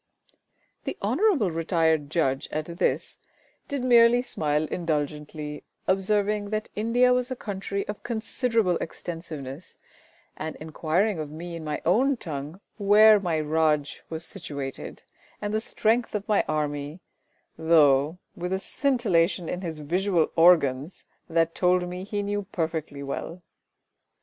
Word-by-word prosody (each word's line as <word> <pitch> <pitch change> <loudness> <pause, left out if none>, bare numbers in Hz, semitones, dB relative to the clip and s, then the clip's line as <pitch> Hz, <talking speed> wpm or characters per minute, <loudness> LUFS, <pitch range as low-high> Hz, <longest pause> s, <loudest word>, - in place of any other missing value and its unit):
The - - -4
Hon'ble 260 - +2
Retired 160 -2 +1
Judge 135 -5 0
at 155 0 -2
this 170 +2 -2 0.5
did 280 -3 -3
merely 240 -1 +6
smile 150 -10 0
indulgently, 150 -2 -3 0.2
observing 205 +2 +1
that 215 0 -3
India 240 +4 +3
was 250 0 0
a 255 - -3
country 200 -3 -4
of 210 - -5
considerable 230 -4 0
extensiveness, 160 -3 -7 0.6
and 155 0 -5
inquiring 160 +5 -1
of 150 -2 -4
me 170 +3 -7
in 165 - -7
my 150 -1 -4
own 255 +10 +3
tongue 155 0 -6 0.2
where 210 +1 +7
my 170 -5 -1
raj 155 -1 +1
was 160 +1 -4
situated, 140 -8 -7 0.4
and 205 0 -3
the 215 - +1
strength 225 +1 0
of 205 -1 -3
my 210 -2 +3
army, 150 +1 -2 0.6
though 155 -1 +4 0.2
with 180 +1 -4
a - - +1
scintillation 195 - +1
in 180 - -3
his 160 -4 -5
visual 175 +2 +1
organs 165 -3 +4 0.3
that 165 0 +2
told 180 0 +2
me 180 +1 -6
he 205 0 -2
knew 205 0 -1
me 200 - -8
perfectly 160 -4 -3
well. 150 +5 -5
175 Hz, 135 wpm, -26 LUFS, 155-210 Hz, 0.6 s, where